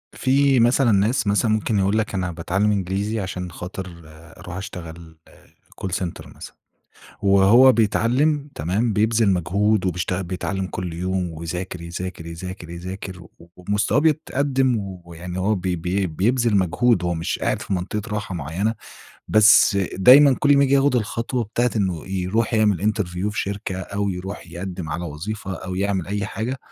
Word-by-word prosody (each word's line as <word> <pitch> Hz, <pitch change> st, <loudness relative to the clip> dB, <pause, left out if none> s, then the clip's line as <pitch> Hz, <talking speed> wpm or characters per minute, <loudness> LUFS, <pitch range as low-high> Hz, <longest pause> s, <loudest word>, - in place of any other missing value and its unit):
في 135 Hz, 0 st, +3 dB
مثلًا 120 Hz, +1 st, +4 dB
ناس 105 Hz, +3 st, +2 dB
مثلًا 105 Hz, +3 st, +2 dB
ممكن 110 Hz, -1 st, +1 dB
يقول 100 Hz, +2 st, +1 dB
لك: 110 Hz, -, -1 dB
"أنا 90 Hz, -2 st, -1 dB
باتعلّم 95 Hz, +5 st, 0 dB
إنجليزي 100 Hz, +3 st, -1 dB
عشان 90 Hz, -2 st, -5 dB
خاطِر 90 Hz, 0 st, -8 dB
أرُوح 85 Hz, +3 st, -11 dB
أشتغل 85 Hz, -4 st, -9 dB
آآ، -, -, -21 dB, 0.4 s
call 95 Hz, -, -1 dB
center 90 Hz, -3 st, -5 dB
مثلًا -, -, -11 dB, 0.7 s
وهو 100 Hz, +6 st, +6 dB
بيتعلّم 130 Hz, +7 st, +1 dB
تمام، 100 Hz, +9 st, 0 dB
بيبذِل 110 Hz, +1 st, +2 dB
مجهود 95 Hz, +3 st, +1 dB
وبيشتغل، 90 Hz, +1 st, -1 dB
بيتعلّم 95 Hz, +1 st, -3 dB
كُل 90 Hz, -2 st, -5 dB
يوم 90 Hz, +1 st, -2 dB
ويذاكر، 85 Hz, +2 st, -5 dB
يذاكر، 85 Hz, 0 st, -6 dB
يذاكر، 85 Hz, +1 st, -8 dB
يذاكر 90 Hz, +2 st, -7 dB
و -, -, -18 dB, 0.3 s
ومستواه 105 Hz, +6 st, +1 dB
بيتقدِّم 140 Hz, -4 st, +1 dB, 0.3 s
ويعني 90 Hz, +2 st, -7 dB
هو 105 Hz, +3 st, +1 dB
بي 90 Hz, -1 st, -2 dB
بي 90 Hz, +3 st, -1 dB
بيبذِل 110 Hz, +7 st, +1 dB
مجهود، 95 Hz, +2 st, +2 dB
هو 85 Hz, 0 st, 0 dB
مش 80 Hz, 0 st, -3 dB
قاعد -, -, -1 dB
في -, -, -3 dB
منطقة 95 Hz, +3 st, -2 dB
راحة 100 Hz, -3 st, -4 dB
معيّنة، 85 Hz, +8 st, -2 dB, 0.5 s
بس 110 Hz, -1 st, +6 dB, 0.2 s
دايمًا 135 Hz, +8 st, +7 dB
كل 145 Hz, -1 st, +4 dB
ما 140 Hz, -, +5 dB
ييجي 140 Hz, 0 st, +3 dB
ياخد 140 Hz, -1 st, +3 dB
الخطوة 115 Hz, +2 st, -1 dB
بتاعة 120 Hz, +3 st, 0 dB
إنه 95 Hz, -6 st, -1 dB
يروح 95 Hz, +5 st, -1 dB
يعمل 105 Hz, -2 st, +2 dB
interview 95 Hz, -2 st, -2 dB
في 105 Hz, -, -3 dB
شركة 100 Hz, -1 st, -3 dB
أو 100 Hz, +2 st, -3 dB
يرُوح 95 Hz, +1 st, -6 dB
يقدِّم 90 Hz, -1 st, -6 dB
على 85 Hz, +3 st, -3 dB
وظيفة 95 Hz, +6 st, -5 dB
أو 95 Hz, 0 st, -6 dB
يعمل 95 Hz, -2 st, -1 dB
أي 100 Hz, 0 st, -2 dB
حاجة، 120 Hz, +7 st, -4 dB
95 Hz, 155 wpm, -22 LUFS, 90-110 Hz, 0.7 s, دايمًا